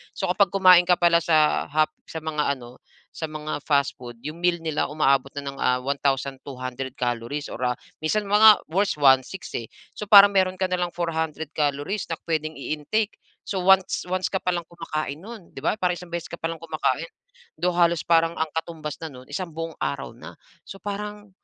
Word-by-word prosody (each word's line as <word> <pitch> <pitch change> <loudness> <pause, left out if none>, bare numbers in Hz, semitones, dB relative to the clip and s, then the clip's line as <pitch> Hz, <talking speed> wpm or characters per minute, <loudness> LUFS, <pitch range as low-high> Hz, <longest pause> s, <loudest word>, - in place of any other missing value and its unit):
So, - - -2
kapag 195 -1 +3
kumain 185 -2 +7
ka 180 - +5
pala 170 -1 +5
sa 155 -2 +3
hap 155 +1 +2 0.2
sa 160 - -6
mga 150 -2 0
ano 120 0 -12 0.4
sa - - -7
mga 155 -1 -5
fastfood, 130 -5 -1
'yong 150 +2 -5
meal 175 0 +1
nila 160 -2 -1
umaabot 135 -3 +2
na - - -7
ng, 140 - -5
ah, 125 0 +2
1200 135 -1 -3
calories, 120 +4 -2
or - - -7
ah, 125 0 0 0.3
minsan 205 +6 0
mga 210 +1 +7
worst, 190 -3 +1
1600, 135 +6 +3
eh. 115 - -4 0.3
So, 210 - -6
parang 200 0 +9
meron 185 -1 +2
ka 190 - +1
na 185 - 0
lang 175 -1 -1
400 160 -3 -3
calories 145 +7 -1
na 165 - -3
puwedeng 155 -2 -3
i-intake. 155 +10 -2 0.3
So, 190 -2 -2
once 190 0 +4
once 185 0 0
ka 190 - -2
palang 175 -2 -1
kumakain 155 -3 -5
no'n, 215 -3 -11
di 135 - -7
ba? 205 - +1
Parang 180 -2 +1
isang 175 -1 -11
beses 170 -1 -4
ka - - -4
pa 165 - -1
lang 165 - -6
kumakain. 160 -1 -1 0.5
Though, 180 -1 0
halos 170 -2 +3
parang 165 -1 +3
ang 160 -1 0
katumbas 160 -2 -5
na 160 - -5
no'n 130 0 -13
isang 185 -3 -4
buong 165 0 -5
araw 70 - -3
na. - - -10 0.3
So 195 - -10
parang, 205 +1 -6
160 Hz, 195 wpm, -24 LUFS, 145-180 Hz, 0.5 s, parang